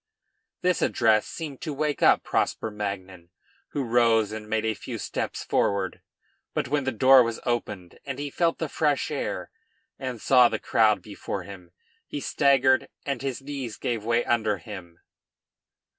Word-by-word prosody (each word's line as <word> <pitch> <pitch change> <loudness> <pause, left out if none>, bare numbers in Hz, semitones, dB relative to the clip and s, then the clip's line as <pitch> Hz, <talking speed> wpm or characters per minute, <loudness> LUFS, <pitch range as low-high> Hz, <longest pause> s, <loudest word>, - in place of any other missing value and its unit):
This 180 0 +2
address 110 -2 +3
seemed 150 -5 -7
to 150 -3 -4
wake 150 0 -1
up - - +5
Prosper 110 - -1
Magnan, 95 -4 -5 0.4
who 140 - -3
rose 115 -3 +3
and 110 -1 -7
made 110 0 0
a 110 - +1
few - - -7
steps - - -4
forward; 100 -2 0 0.5
but - - 0
when 145 +1 0
the 130 - +1
door 130 +3 +7
was 115 -1 -1
opened 105 -7 -3
and 135 -2 -5
he 145 0 -4
felt 170 +2 +1
the 160 - -2
fresh 150 -1 0
air 145 - -3 0.5
and 130 -3 -4
saw 125 -1 +6
the - - -1
crowd 110 -2 +2
before 100 -2 -5
him, 90 -2 -11 0.4
he 145 - -4
staggered 135 -2 +3 0.2
and 140 -4 -2
his 135 -1 -4
knees 135 -6 -5
gave 115 -3 -2
way 115 +1 +1
under 110 -3 +1
him. 85 -2 -10
120 Hz, 160 wpm, -26 LUFS, 105-135 Hz, 0.5 s, door